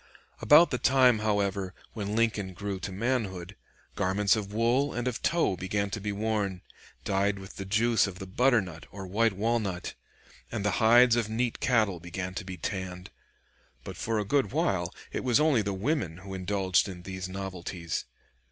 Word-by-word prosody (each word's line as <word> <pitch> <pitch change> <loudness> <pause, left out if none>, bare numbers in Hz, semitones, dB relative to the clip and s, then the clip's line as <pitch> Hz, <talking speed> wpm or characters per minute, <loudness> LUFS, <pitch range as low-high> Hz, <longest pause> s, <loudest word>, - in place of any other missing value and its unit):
About 160 +4 +7
the 125 - -1
time, 130 -4 +4
however, 100 -3 -1 0.2
when 105 -1 -3
Lincoln 105 -5 0
grew 100 0 -4
to 95 - -5
manhood, 100 -4 -2 0.4
garments 100 +2 +2
of 105 -2 -4
wool 120 +6 +1
and 120 +1 -2
of 125 -1 -2
tow 170 - +2
began 100 +3 -2
to 110 - -4
be 105 +1 -2
worn, 100 -3 -2 0.4
dyed 100 +1 +1
with 95 -1 -11
the 100 - -5
juice 110 +3 +3
of 95 -2 -7
the 95 - -7
butternut 95 - +1
or 95 0 -8
white 110 +4 +1
walnut, 105 -3 -1 0.6
and 105 -2 -3
the 100 -3 +1
hides 120 +2 +6
of 115 -3 0
neat 115 +1 -1
cattle 110 -8 +2
began 90 +2 -5
to 95 - -4
be 95 -1 -7
tanned. 90 0 -5 0.7
But - - -7
for 115 -1 -2
a 105 - -1
good 135 -1 +1
while - - 0 0.2
it - - -3
was 125 -1 +3
only 150 -7 +4
the 100 0 -2
women 100 - -1
who 95 +2 -9
indulged 95 0 +1
in 90 -2 -9
these 95 0 -5
novelties. 95 -3 -5
100 Hz, 175 wpm, -28 LUFS, 95-115 Hz, 0.7 s, About